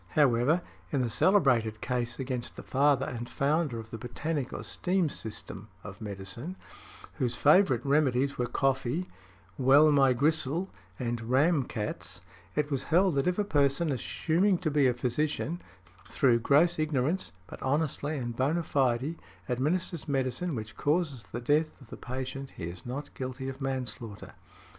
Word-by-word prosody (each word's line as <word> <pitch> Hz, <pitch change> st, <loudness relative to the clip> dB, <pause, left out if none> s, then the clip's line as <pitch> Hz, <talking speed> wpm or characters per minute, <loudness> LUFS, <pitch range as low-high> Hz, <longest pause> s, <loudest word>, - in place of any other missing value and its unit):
However, 145 Hz, +4 st, +4 dB, 0.3 s
in 140 Hz, -, +1 dB
the 120 Hz, -2 st, -1 dB
celebrated 120 Hz, -, +3 dB
case 120 Hz, -1 st, -2 dB
against 130 Hz, -2 st, -4 dB
the -, -, -8 dB
father 140 Hz, 0 st, +3 dB
and 120 Hz, 0 st, -5 dB
founder 145 Hz, -2 st, 0 dB
of 115 Hz, 0 st, -8 dB
the 115 Hz, -, -6 dB
botanic 135 Hz, +3 st, -3 dB
or -, -, -5 dB
steam 180 Hz, -3 st, 0 dB
system 110 Hz, -4 st, -6 dB, 0.2 s
of 105 Hz, +1 st, -9 dB
medicine, 105 Hz, -, -6 dB, 0.6 s
whose 120 Hz, -1 st, 0 dB
|89| -, -, -9 dB
favorite 150 Hz, -, +4 dB
remedies 140 Hz, -1 st, +2 dB
were 125 Hz, -, -1 dB
coffee, 135 Hz, +6 st, 0 dB, 0.5 s
"well 140 Hz, +4 st, +6 dB
my 135 Hz, -3 st, +5 dB
gristle," 155 Hz, +6 st, 0 dB, 0.3 s
and 120 Hz, -2 st, -3 dB
"ram 140 Hz, +2 st, +3 dB
cats," 105 Hz, -4 st, -5 dB, 0.3 s
it 150 Hz, 0 st, 0 dB
was 135 Hz, -, -1 dB
held, 180 Hz, +2 st, +3 dB
that 140 Hz, +4 st, +1 dB
if 180 Hz, -, +1 dB
a 210 Hz, -, +2 dB
person 145 Hz, -3 st, +2 dB
assuming 175 Hz, -, +1 dB
to 170 Hz, -3 st, -2 dB
be 145 Hz, -2 st, +4 dB
a 125 Hz, -, +2 dB
physician, 150 Hz, +7 st, -1 dB, 0.5 s
through 120 Hz, -4 st, +3 dB
gross 155 Hz, +8 st, +4 dB
ignorance, 155 Hz, +3 st, 0 dB
but -, -, -11 dB
honestly 145 Hz, +1 st, 0 dB
and 120 Hz, -3 st, -4 dB
bona 150 Hz, +7 st, +1 dB
fide, 135 Hz, +2 st, +1 dB, 0.3 s
administers 155 Hz, +7 st, -1 dB
medicine 140 Hz, +4 st, -1 dB
which 110 Hz, -2 st, -6 dB
causes 150 Hz, -5 st, 0 dB
the 120 Hz, -, -4 dB
death 150 Hz, +5 st, +1 dB
of 130 Hz, -5 st, -17 dB
the -, -, -5 dB
patient, 130 Hz, +2 st, -6 dB
he -, -, -6 dB
is 85 Hz, +6 st, -6 dB
not 140 Hz, +4 st, -5 dB
guilty 130 Hz, 0 st, -5 dB
of 135 Hz, +1 st, -6 dB
manslaughter. 125 Hz, -5 st, -4 dB
135 Hz, 155 wpm, -29 LUFS, 120-155 Hz, 0.6 s, well